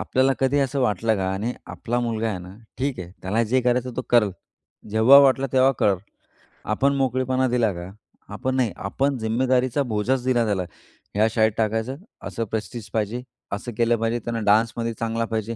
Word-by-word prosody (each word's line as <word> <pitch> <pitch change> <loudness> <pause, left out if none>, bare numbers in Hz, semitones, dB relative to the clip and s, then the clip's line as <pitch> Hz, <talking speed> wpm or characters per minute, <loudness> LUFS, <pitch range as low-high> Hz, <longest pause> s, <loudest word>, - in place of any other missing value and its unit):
आपल्याला 130 +1 +2
कधी 135 +2 +2
असं 140 0 0
वाटलं 110 -2 +1
का? 95 -1 -1
आणि 105 +5 -2
आपला 120 +1 -3
मुलगा 115 -2 -1
आहे 100 -4 -3
ना 90 +1 -10 0.2
ठीक 135 -2 -1
आहे, 90 -1 -8
त्याला 105 +5 +1
जे 125 +3 +2
करायचं 125 0 0
तो 130 - -1
करेल. 115 -4 +4 0.6
जेव्हा 110 +6 +7
वाटलं 135 -1 +4
तेव्हा 130 +1 +5
करेल. 100 -2 +3 0.8
आपण 140 +1 +2
मोकळेपणा 130 0 +1
दिला 120 -3 +2
का? 85 +1 -7 0.4
आपण, 130 +5 -2
नाही. 125 -5 +1
आपण 135 +7 -1
जिम्मेदारीचा 125 +4 +1
बोजाच 120 +2 -1
दिला 120 -2 +2
त्याला. 100 -4 0 0.5
ह्या 105 +2 +4
शाळेत 110 -1 +3
टाकायचं, 110 +3 -1 0.3
असं 115 - -3
प्रेस्टीज 110 0 -5
पाहिजे, 110 +2 -1 0.3
असं 100 +5 -4
केलं 120 0 +3
पाहिजे, 115 +1 0
त्यांना 115 0 -3
डान्समध्ये 115 +2 +2
चांगला 115 0 -1
पाहिजे, 110 +1 -2
115 Hz, 175 wpm, -23 LUFS, 110-130 Hz, 0.8 s, जेव्हा